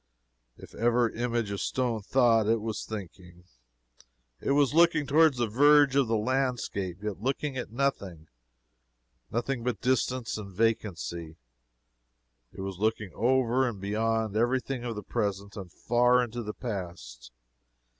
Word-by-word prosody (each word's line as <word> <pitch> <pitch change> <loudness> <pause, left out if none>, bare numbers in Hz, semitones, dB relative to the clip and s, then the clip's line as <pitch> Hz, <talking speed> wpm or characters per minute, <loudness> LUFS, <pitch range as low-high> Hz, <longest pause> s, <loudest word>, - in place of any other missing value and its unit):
If - - -13
ever 120 0 +2
image 120 -3 -2
of 100 - -3
stone 120 -4 -1
thought, 115 -1 +3
it 115 +1 +2
was 110 0 -4
thinking. 90 -4 -9 1.0
It 140 - 0
was 145 -1 +3
looking 165 -2 +4
toward 155 +1 +4
the 120 -1 0
verge 145 +4 +5
of 140 -3 +3
the 115 0 +1
landscape, 110 -6 -2
yet 105 -2 -4
looking 135 +3 -2
at 125 -4 -5
nothing 100 - -2 1.0
nothing 120 +1 -2
but 120 -5 -2
distance 130 -1 0
and 100 -2 -8
vacancy. 90 -6 -2 1.2
It - - -9
was 95 -1 -5
looking 110 -2 -1
over 130 +2 +2
and 105 -4 -8
beyond 110 +1 -1
every 120 +4 +2
thing 130 -1 -5
of 120 -2 -4
the 105 - -6
present, 100 -3 -3
and 95 -4 -8
far 125 +4 +3
into 120 0 -5
the 105 -2 -6
past. 85 - -7
115 Hz, 145 wpm, -28 LUFS, 100-130 Hz, 1.2 s, verge